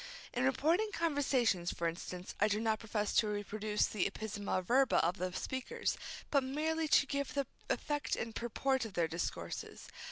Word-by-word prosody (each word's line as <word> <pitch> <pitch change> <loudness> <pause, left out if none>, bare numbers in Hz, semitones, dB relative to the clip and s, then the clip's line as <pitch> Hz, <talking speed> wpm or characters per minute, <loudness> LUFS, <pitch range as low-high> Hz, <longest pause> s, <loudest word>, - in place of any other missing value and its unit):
In 250 +1 +1
reporting 320 +11 +2
conversations, 265 - +2
for 170 - -1
instance, 175 +2 -5
I 210 - +5
do 210 0 +1
not 220 -1 +1
profess 210 -2 -1
to 215 - +5
reproduce 210 0 0
the 200 -2 0
ipsissima 205 -3 -3
verba 260 +4 +4
of 175 +3 +1
the 185 0 -2
speakers, 260 - -2 0.4
but 280 -2 +4
merely 310 +4 0
to 285 - +5
give 280 0 -2
the 280 -1 +1 0.2
effect 295 -1 0
and 225 0 -4
purport 260 +3 0
of 220 -3 -6
their 170 -2 +2
discourses. 165 +2 -4
225 Hz, 165 wpm, -35 LUFS, 205-280 Hz, 0.4 s, I